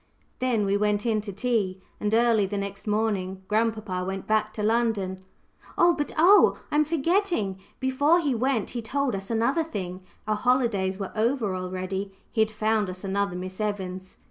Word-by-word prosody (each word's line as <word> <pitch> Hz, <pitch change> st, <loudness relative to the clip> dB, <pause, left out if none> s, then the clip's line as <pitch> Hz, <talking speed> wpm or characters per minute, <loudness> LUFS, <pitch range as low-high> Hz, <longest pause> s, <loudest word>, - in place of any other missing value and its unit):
Then 240 Hz, -5 st, +1 dB
we 200 Hz, +1 st, +2 dB
went 210 Hz, +1 st, +1 dB
in 220 Hz, -2 st, +1 dB
to 205 Hz, -1 st, -6 dB
tea, 205 Hz, -3 st, -1 dB, 0.2 s
and 210 Hz, -, -1 dB
early 230 Hz, -3 st, +3 dB
the 205 Hz, +1 st, -3 dB
next 200 Hz, +1 st, -5 dB
morning 200 Hz, -3 st, -1 dB
grandpapa 215 Hz, -4 st, 0 dB
went 190 Hz, +1 st, -4 dB
back 215 Hz, 0 st, +1 dB
to 210 Hz, -, -3 dB
London. 210 Hz, -4 st, 0 dB, 0.5 s
But 335 Hz, -4 st, +3 dB
oh! 370 Hz, +6 st, +6 dB
I -, -, -1 dB
am 305 Hz, -, +4 dB
forgetting 330 Hz, -, 0 dB, 0.2 s
before 285 Hz, +6 st, +3 dB
he 290 Hz, -6 st, 0 dB
went 240 Hz, -2 st, 0 dB
he 240 Hz, -, -3 dB
told 265 Hz, +3 st, -1 dB
us 195 Hz, 0 st, -4 dB
another 235 Hz, +8 st, +1 dB
thing. 185 Hz, -, -5 dB, 0.3 s
Our 215 Hz, -, +2 dB
holidays 230 Hz, -6 st, +1 dB
were 195 Hz, -2 st, -5 dB
over 225 Hz, -3 st, +1 dB
already. 185 Hz, +2 st, -4 dB, 0.2 s
He 220 Hz, -, +1 dB
had 220 Hz, -, +3 dB
found 215 Hz, -1 st, 0 dB
us 185 Hz, +1 st, -7 dB
another 200 Hz, -1 st, -1 dB
Miss 185 Hz, +2 st, -6 dB
Evans! 190 Hz, -3 st, -4 dB
215 Hz, 170 wpm, -26 LUFS, 195-240 Hz, 0.5 s, oh